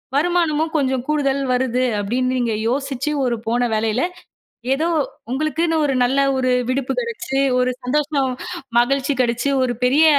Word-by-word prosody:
வருமானமும் 320 0 +1
கொஞ்சம் 265 -3 0
கூடுதல் 280 -2 +1
வருது 250 0 0 0.2
அப்படின்னு 255 +5 0
நீங்க 235 -2 0 0.2
யோசிச்சு, 275 +2 -2
ஒரு 240 -1 +1
போன 240 +1 +1
வேலையில 220 +2 0 0.7
ஏதோ 315 +4 -1 0.4
உங்களுக்குன்னு 310 +4 0
ஒரு 275 -2 +1
நல்ல 265 +3 +2 0.2
ஒரு 255 0 +1 0.2
விடுப்பு 255 0 -1
கெடைச்சு, 435 - -3 0.2
ஒரு 250 0 +2
சந்தோஷம், 280 0 0 0.5
மகிழ்ச்சி 275 +3 +2
கெடைச்சு 240 +2 +1
ஒரு 250 -1 +1
பெரிய 285 +6 +5
270 Hz, 135 wpm, -20 LUFS, 250-300 Hz, 0.7 s, பெரிய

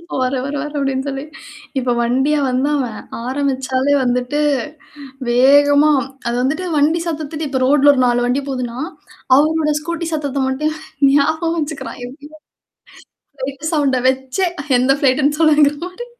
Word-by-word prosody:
இப்ப 340 +1 -10
வர, 255 0 0
வர 280 +1 -4
வர 295 - -5
அப்படின்னு 270 0 -1
சொல்லி. 270 -1 -4 0.6
இப்ப 250 -1 0
வண்டியா 265 +5 +1
வந்தாவன். 255 -3 -1 0.3
ஆரம்பிச்சாலே 265 0 0
வந்துட்டு, 250 +4 0 0.9
வேகமா 285 +4 +5 0.4
அது 235 - -1
வந்துட்டு 305 +8 -1
வண்டி 305 +4 +2
சத்தத்துட்டு 310 -1 -4
இப்ப 265 -1 -2
ரோட்ல 285 +1 +5
ஒரு 260 - 0
4 245 0 +2
வண்டி 250 +3 +1
போதுன்னா, 250 -3 -4 0.6
அவரோட 305 +1 +2
ஸ்கூட்டி 335 +1 -4
சத்தத்த 285 -3 -2
மட்டும் 305 +4 -1 0.3
ஞாபகம் 315 +4 +1
வச்சுக்கிறான், 295 -3 -6
எப்டியோ 290 +4 -13 1.0
ஃப்ளைட் 275 +2 -6
சவுண்ட 280 -4 +2
வச்சே 265 +7 -1 0.3
எந்த 260 +2 +3
ஃப்ளைட்ன்னு 285 +2 +2
சொல்லுவாங்கிறமாரி. 310 +8 +2
280 Hz, 130 wpm, -18 LUFS, 260-300 Hz, 1.0 s, வேகமா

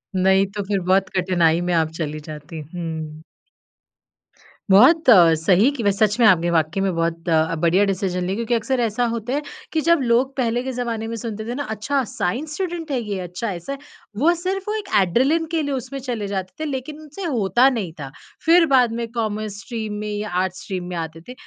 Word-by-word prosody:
नहीं 190 +1 +4
तो 205 -1 -4
फिर 200 -2 0
बहुत 185 +2 +2
कठिनाई 175 -2 +2
में 175 0 -1
आप 160 -1 +2
चली 155 -2 -3
जाती। 155 +2 -9
हुँ। 160 -2 -5 1.5
बहुत 265 - +6
अ, 175 -7 +8
सही 190 +8 +4
कि 255 -6 -5
वे 200 - +4
सच 210 +2 +1
में, 235 - +5
आपने 175 -3 +4
वाकई 165 +3 +1
में 190 -2 0
बहुत 165 +1 -2
अ, 160 0 +2
बढ़िया 175 +4 +4
डिसीज़न 185 -2 -1
ली, 185 - -1
क्योंकि 235 +2 -2
अक्सर 245 +3 0
ऐसा 235 +1 0
होता 235 +3 -3
है 290 - 0 0.3
कि 315 - +1
जब 335 0 +3
लोग 250 +2 +1
पहले 240 -1 0
के 265 - -3
ज़माने 235 -3 -3
में 230 - -4
सुनते 220 -1 -5
थे 240 - -4
ना, 285 - -3
अच्छा 255 +4 -1
साइंस 280 - -2
स्टूडेंट 345 -4 -4
है 260 - 0
ये, 205 -3 -4
अच्छा 180 +4 -4
ऐसा 180 +10 -5
है। - - -6 0.4
वो 325 +7 +4
सिर्फ 385 +2 -3
वो 425 - -1
एक 425 -2 -5
एड्रेलिन 265 - +2
के 320 - +2
लिए 285 -1 -2
उसमें 265 +2 -5
चले 235 -6 -4
जाते 190 -2 -4
थे - - -1
लेकिन 280 +3 -5
उनसे 305 +6 -9
होता 245 - +3
नहीं 220 -10 -3
था, 135 -2 -7 0.3
फिर 335 +1 +6
बाद 245 -3 +4
में 235 - -2
कॉमर्स 215 -3 -3
स्ट्रीम 220 -3 -5
में 210 0 -4
या 210 +1 -3
आर्ट्स 185 -1 -5
स्ट्रीम 185 -2 -4
में 180 - -4
आते 165 0 -5
थे। 250 - -7
215 Hz, 210 wpm, -21 LUFS, 180-260 Hz, 1.5 s, अ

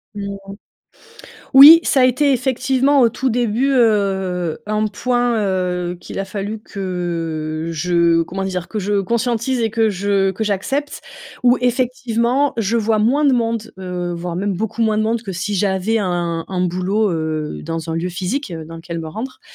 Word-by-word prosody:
Mmh. 200 -1 -5 1.2
Oui, 290 +5 +10
ça 275 - +2
a 255 - +6
été 275 +3 +3
effectivement 265 +2 +2
au 240 - +5
tout 255 +3 -2
début, 240 +2 0
heu, 190 -8 +1
un 215 0 0
point, 245 +2 0
heu, 180 -2 -2
qu'il - - -8
a 195 - -1
fallu 205 +2 -5
que, 165 -5 -4
je 170 0 +2
comment 190 +4 -5
dire, 185 -2 -4
que 215 - -4
je 205 +1 0
conscientise 235 +4 -1
et 225 - 0
que 225 0 +1
je 195 0 +1
que 220 +4 -3
j'accepte 270 +9 -2 0.4
où, 245 0 +4
effectivement, 250 +1 0
je 225 +1 0
vois 220 -1 +1
moins 265 +8 +2
de 275 - +4
monde, 230 -2 -1
heu, 180 -1 -4
voire 170 0 -5
même 200 +1 -1
beaucoup 220 +4 -4
moins 220 -1 +2
de 215 - +1
monde 225 +1 -1
que 195 - -6
si 185 +3 -3
j'avais 195 +3 0
un 175 -4 -2
un 185 -1 -2
boulot, 185 +4 0
heu, 155 -2 -3
dans 165 0 -4
un - - -2
lieu 170 +2 -2
physique, 185 +7 -3
heu, 160 -1 -6
dans 165 +1 -10
lequel 165 0 -6
me 160 - -6
rendre. 225 +11 -7
205 Hz, 180 wpm, -19 LUFS, 180-235 Hz, 1.2 s, Oui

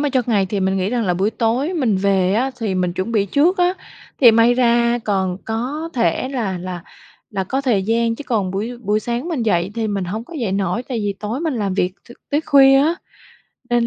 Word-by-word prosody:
mà 290 - +1
cho 255 -2 +1
ngày 205 -5 +2
thì 200 +1 -2
mình 190 +1 +1
nghĩ 190 +1 0
rằng 240 -3 0
là 180 -2 +1
buổi 195 +4 +1
tối 245 +9 0
mình 240 - +1
về 190 -1 +2
á 255 +4 +1
thì 205 -4 -1
mình 180 -1 0
chuẩn 185 +6 -3
bị 200 -2 +2
trước 330 - +2
á, 360 +1 +3 0.5
thì 240 -3 +9
may 230 +2 +4
ra 240 -1 +2
còn 190 -3 0
có 260 +9 -3
thể 230 +1 0
là 215 -9 -2
là 180 -1 -6 0.5
là 195 -2 -2
có 265 +8 -2
thời 235 -8 +1
gian. 230 +2 +1
Chứ 290 - -9
còn 210 -7 0
buổi 220 +6 -4
buổi 210 -1 0
sáng 240 +8 -3
mình 295 -9 -2
dậy 180 -3 +1
thì 225 -1 -1
mình 200 -2 -2
hổng 215 +6 -4
có 340 - -13
dậy 200 -5 -1
nổi, 195 +3 -1
tại 245 -3 -4
vì 205 -1 -2
tối 220 +7 -3
mình 320 -5 -1
làm 200 -4 -2
việc 180 -1 0 0.2
t - - -11 0.2
tới 295 +2 +2
khuya 270 -3 +6
á 310 +4 +2 0.8
nên 240 -1 +2
225 Hz, 240 wpm, -19 LUFS, 195-255 Hz, 0.8 s, thì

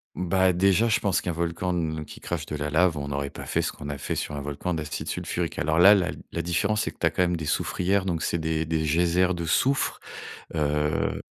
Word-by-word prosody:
Ben 90 0 +2
déjà, 95 +5 +3
je 115 +1 +2
pense 100 -3 +2
qu'un 90 - -3
volcan 85 +2 -2
ne 80 -2 -2
qui - - -12
crache 85 -4 -3
de 75 - -5
la 75 0 -3
lave, 80 +1 +3
on 70 0 -4
aurait 70 0 -2
pas - - -9
fait - - 0
ce - - -2
qu'on 75 - -8
a 70 - -4
fait 65 - -3
sur - - -3
un 70 - -3
volcan 75 +5 -3
d'acide 80 -1 -4
sulfurique. - - -3
Alors 80 +1 +1
là, 95 +4 +9
la 90 -3 +2 0.2
la 85 - -2
différence, 100 +6 0
c'est - - -3
que - - -26
tu - - +1
as - - +5
quand 90 - +1
même 90 -1 +1
des 80 - -4
soufrières, 95 +5 0
donc 85 -4 -1
c'est - - 0
des 80 -1 -1
des 80 0 -1
geysers 90 +3 +2
de 85 - -4
soufre, 135 - +1 0.6
heu 75 -1 0
85 Hz, 245 wpm, -26 LUFS, 75-90 Hz, 0.6 s, là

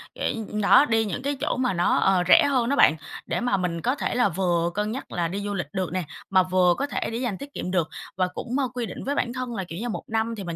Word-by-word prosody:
để - - -1 0.3
đó, 275 +8 +6
đi 225 -1 +2
những 215 +4 -4
cái 285 +1 -1
chỗ 300 -4 0
mà 250 -5 +1
nó, 175 0 +2
ờ, 190 -2 +3
rẻ 185 - +7
hơn 255 -4 +1
đó 280 - +2
bạn, 160 - +6 0.3
để - - -2
mà 240 -5 +1
mình 175 -2 -2
có 250 - +1
thể - - -2
là 245 -4 +3
vừa 175 -1 0
cân 210 +1 -1
nhắc 260 - -6
là 175 -1 -1
đi 195 +4 -4
du 205 0 -3
lịch 185 -3 -3
được 185 -2 -2
nè, 185 -1 -1 0.3
mà 190 -1 +5
vừa 180 -1 +3
có 280 - -1
thể - - -3
để 230 - -3
dành 235 -6 -2
tiết 285 +1 -10
kiệm 180 - -4
được 170 -4 +1 0.3
và 185 -1 +2
cũng, 245 - -5
ờ, 265 - +1
quy 245 -2 -2
định 185 - -7
với 285 +2 -1
bản 240 -3 -1
thân 255 -2 -4
là 195 - -2
kiểu 170 -1 -7
như 240 +2 -3
1 215 - -4
năm 225 +1 -1
thì 200 - -5
mình 170 -2 -5
205 Hz, 295 wpm, -25 LUFS, 180-245 Hz, 0.3 s, rẻ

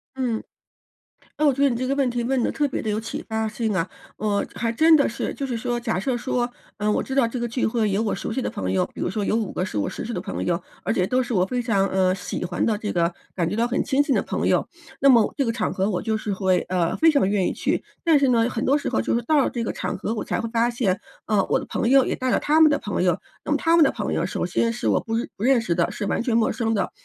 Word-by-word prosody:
嗯。 245 -4 -1 1.0
那 305 - +3
我 285 - +5
觉 275 - -3
得 280 - +5
你 240 - -1
这 255 - -2
个 270 - +1
问 275 -2 +1
题 240 0 -2
问 260 +1 +1
得 - - 0
特 295 -2 0
别 265 - -3
地 220 - -3
有 210 +1 0
启 225 - -6
发 220 0 -1
性 220 0 -2
啊。 170 -1 0 0.3
嗯， 205 -1 0
还 230 -1 -1
真 315 +7 +5
的 285 - +4
是 225 - -3
就 275 - -3
是 255 -3 -3
说 240 +1 -2
假 225 -6 -1
设 250 +4 -1
说， 245 0 -1 0.3
嗯， 210 +1 0
我 - - +1
知 265 - -6
道 270 -3 +3
这 245 +2 -4
个 240 - -1
聚 245 +2 -3
会 220 -2 +1
有 195 +2 +1
我 220 -2 0
熟 - - -4
悉 265 - -1
的 - - -2
朋 215 - -3
友， 185 - +2
比 - - -14
如 - - 0
说 205 +1 -2
有 205 - 0
5 225 -4 -1
个 - - -2
是 185 - -4
我 100 - 0
熟 - - -5
悉 235 - -5
的 180 - -2
朋 195 +2 -4
友， 170 -1 +1 0.2
而 - - -1
且 180 - +1
都 255 +6 +1
是 245 -2 -3
我 180 -1 +3
非 250 +4 -2
常， 200 -5 +1
呃， 185 -1 +2
喜 185 - -5
欢 175 0 -1
的 220 - +2
这 210 - -3
个 170 0 +1 0.2
感 170 -3 0
觉 205 - -2
到 230 +2 +1
很 245 - 0
亲 275 0 +2
近 285 -2 +1
的 - - +1
朋 - - -2
友， - - +2 0.3
那 275 - +5
么 235 -5 +5
这 275 - +1
个 230 - +1
场 230 -1 -1
合 190 +1 0
我 180 - -1
就 220 0 -1
是 210 -1 -3
会 185 -1 +2
呃， 180 -2 0
非 325 0 +5
常 280 -10 +2
愿 200 -3 +1
意 - - -1
去。 - - -1 0.2
但 330 -3 +5
是 280 -1 +3
呢， 235 -1 +3
很 235 -2 -3
多 275 - +3
时 290 - -1
候 - - 0
就 110 - 0
是 235 - +1
到 310 +4 +2
了 - - +1
这 235 - -3
个 - - -2
场 - - -4
合， 220 - -3
我 215 - -3
才 - - -2
会 230 - -4
发 235 +1 +1
现， 210 -6 0 0.3
呃， 210 -3 +2
我 - - +3
的 - - -7
朋 - - -1
友 270 0 +6
也 - - -1
带 255 0 -1
了 - - +3
他 305 +2 +2
们 315 -1 +7
的 290 - +1
朋 - - -2
友。 - - +2 0.3
那 - - -3
么 - - +3
他 330 0 +3
们 320 - +7
的 - - +3
朋 - - -3
友， - - 0
首 - - -3
先 230 0 0
是 240 - -3
我 - - +3
不 225 - -6 0.2
不 205 - -6
认 255 -1 +4
识 180 -7 -1
的， 170 -1 +1
是 205 - -4
完 - - 0
全 240 -2 0
陌 230 -1 +3
生 225 -2 -1
的， 195 -4 -1
230 Hz, 335 characters per minute, -23 LUFS, 205-255 Hz, 1.0 s, 们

